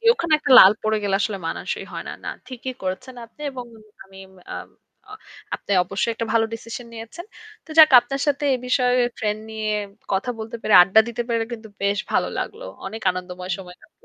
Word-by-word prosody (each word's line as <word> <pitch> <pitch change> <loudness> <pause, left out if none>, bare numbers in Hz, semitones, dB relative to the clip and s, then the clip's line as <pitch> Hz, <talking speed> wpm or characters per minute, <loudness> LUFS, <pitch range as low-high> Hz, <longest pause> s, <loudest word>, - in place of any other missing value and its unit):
জী, - - -18
ওখানে 340 -8 -2
একটা 295 -2 -4
লাল 190 - +10
পড়ে 215 0 +1
গেলে 195 -1 +2
আসলে 205 -2 -1
মানসই - - -4
হয় - - -6
না। - - -4
না, - - -3 0.2
ঠিকই 255 0 -6
করেছেন 220 +8 -4
আপনি 230 - -27
এবং 250 -2 -7 0.4
আমি 195 0 -16 0.4
আম - - -7 0.4
অ্যা 425 - -10 0.4
আপনি - - -14
অবশ্যই 195 +5 -1
একটা 230 0 -3
ভালো 230 -1 +3
decision 230 +2 -8
নিয়েছেন। 230 +10 -9 0.4
তো 320 - -16
যাক 310 -1 +10
আপনার 275 +3 -5
সাথে 290 0 0
এ - - +1
বিষয়ে 250 0 +2 0.3
ট্রেন্ড 210 0 -1
নিয়ে 220 -1 -3 0.4
কথা 195 +6 0
বলতে 225 +2 -6
পেরে, 215 - +2
আড্ডা 195 +4 +5
দিতে 235 0 -3
পেরে 230 -1 0
কিন্তু 220 -2 -8
বেশ 200 0 +1
ভালো - - +2
লাগলো। - - -5 0.2
অনেক 220 +3 -7
আনন্দময় 180 0 -6
সময় 180 -2 -11
লাগল। 315 - -24
225 Hz, 195 wpm, -22 LUFS, 200-255 Hz, 0.4 s, লাল